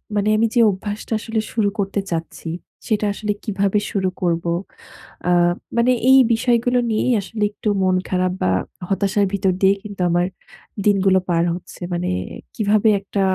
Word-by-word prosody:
মানে 205 +1 +1
আমি 225 - +3
যে - - +4
অভ্যাসটা 205 +3 -4
আসলে 225 0 -2
শুরু 215 -3 +2
করতে 200 0 -1
চাচ্ছি, 165 0 -4 0.4
সেটা 215 -1 +1
আসলে 210 +1 -3
কিভাবে 200 -1 +1
শুরু 190 -2 0
করবো। 170 -1 0 0.8
আ - - +3 0.5
মানে 235 +2 +4 0.2
এই 265 - +8
বিষয়গুলো 240 +1 +2
নিয়েই 225 +3 +1
আসলে 210 +2 -6
একটু 210 - -5
মন 185 -1 +3
খারাপ 185 0 0
বা 95 - +2 0.4
হতাশার 200 +1 +1
ভিতর 195 -1 +1
দিয়ে 195 0 +5
কিন্তু 205 -2 -9
আমার 175 +1 +2 0.6
দিনগুলো 195 -2 +4
পার 170 -1 +2
হচ্ছে। 180 - -10
মানে 175 +1 -1 0.5
কিভাবে 215 0 +2
একটা 200 0 -3
200 Hz, 155 wpm, -20 LUFS, 185-215 Hz, 0.8 s, এই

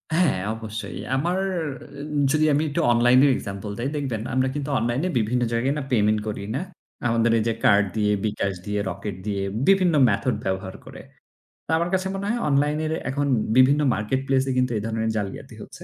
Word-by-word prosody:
হ্যাঁ, 165 - +2
অবশ্যই। 110 -5 -6 0.2
আমার 175 +7 0 0.9
যদি 155 0 +3
আমি 145 +2 +2
একটু 145 - -1
online-এর 125 +4 +5
example 100 0 -6
দেই, 125 +3 -1
দেখবেন 130 -7 -2
আমরা 130 +1 +2
কিন্তু 145 0 -3
online-এ 120 +9 -1
বিভিন্ন 120 +3 0
জায়গায় 125 +4 +1
না 150 - -3
payment 105 -2 +3
করি, 105 -2 -4
না? 140 - -1 0.5
আমাদের 115 0 +2
এই 110 - +1
যে 115 - +1
card 105 -5 +5
দিয়ে, 105 -1 +2
bKash 100 -3 -1
দিয়ে, 105 0 -2
Rocket 100 +2 -5
দিয়ে 100 -2 -2 0.3
বিভিন্ন 185 -3 +4 0.2
method 130 - 0
ব্যবহার 95 0 -3
করে। - - -10 0.6
তা - - -5
আমার 170 +1 0
কাছে 190 0 +1
মনে 195 +1 -4
হয় 235 +2 0
online-এর 150 +3 +1 0.2
এখন 145 +2 -1 0.3
বিভিন্ন 140 +3 +5
marketplace-এ 130 +5 0
কিন্তু 125 -1 +2
এই 105 - -2
ধরনের 110 0 -1
জালিয়াতি 100 -2 -5
হচ্ছে। - - -11
125 Hz, 175 wpm, -24 LUFS, 105-145 Hz, 0.9 s, online-এর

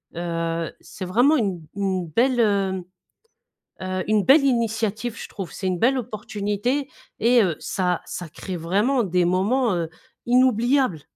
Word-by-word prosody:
heu 165 -1 -2
c'est 190 - -8
vraiment 245 +12 +4
une 195 -7 -1
une 190 -3 -1
belle, 245 - +2
heu, 195 -4 +1 1.0
heu, 185 0 -2
une 215 -1 +3
belle 275 +2 +6
initiative. 225 -3 0
Je - - -8
trouve 195 -4 -7
c'est 190 - -4
une 180 -1 -1
belle 260 +6 +3
opportunité. 220 +3 -2 0.3
Et 235 +1 +5
heu, 175 -5 0
ça 180 -2 -1
ça 175 - -6
crée 185 +4 -6
vraiment 205 +10 +1
des 180 -2 +1
moments, 205 +7 +2
heu, 170 -2 -2 0.4
inoubliables. 250 - +3
205 Hz, 145 wpm, -23 LUFS, 180-245 Hz, 1.0 s, belle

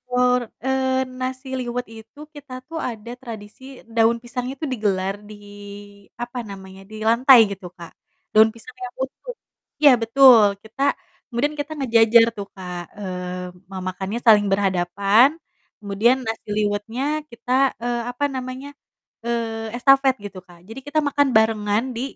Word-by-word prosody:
Eee, 260 +1 +1 0.2
nasi 260 +1 -4
liwet 245 0 -3
itu 225 +5 -14 0.2
kita 285 -3 -11 0.2
tuh 325 -1 -5
ada 235 -3 -5
tradisi 235 +3 -11
daun 230 +1 +4
pisangnya 250 +2 -5
tuh 305 - -2
digelar 195 -4 -1
di, 210 - -9 0.9
apa 240 +1 -6
namanya, 190 -1 -10
di - - -9
lantai 245 +3 +6
gitu, 185 -2 -7
Kak. 170 -1 -10 0.4
Daun 220 +1 +6
pisang 230 +2 -13
yang 245 - -6
utuh - - -8 0.5
iya 290 - +8
betul, 230 -4 +6
kita 220 +5 -10 0.5
kemudian 265 +4 -1
kita 290 +2 -4
ngejejer 230 -3 +5
tuh 200 0 -5
Kak, 180 -2 -6
eee, 180 -2 -6 0.2
ma 190 - -7
makannya 190 +5 -4
saling 215 -3 +6
berhadapan, 195 +5 +3 0.5
kemudian 210 +5 +2
nasi 225 -1 -5
liwetnya 210 +4 -2 0.3
kita, 235 +1 -8 0.3
eee, 240 0 -1
apa 245 +4 -5
namanya, 255 +1 -6 0.6
eee, 225 -1 -3
estafet 270 +1 +4
gitu, 195 -2 -8
Kak. 175 -1 -17
Jadi 225 +5 -8
kita 300 +1 +1
makan 285 0 +2
barengan 220 -1 +2
di, 230 - -4
230 Hz, 140 wpm, -22 LUFS, 205-255 Hz, 0.9 s, iya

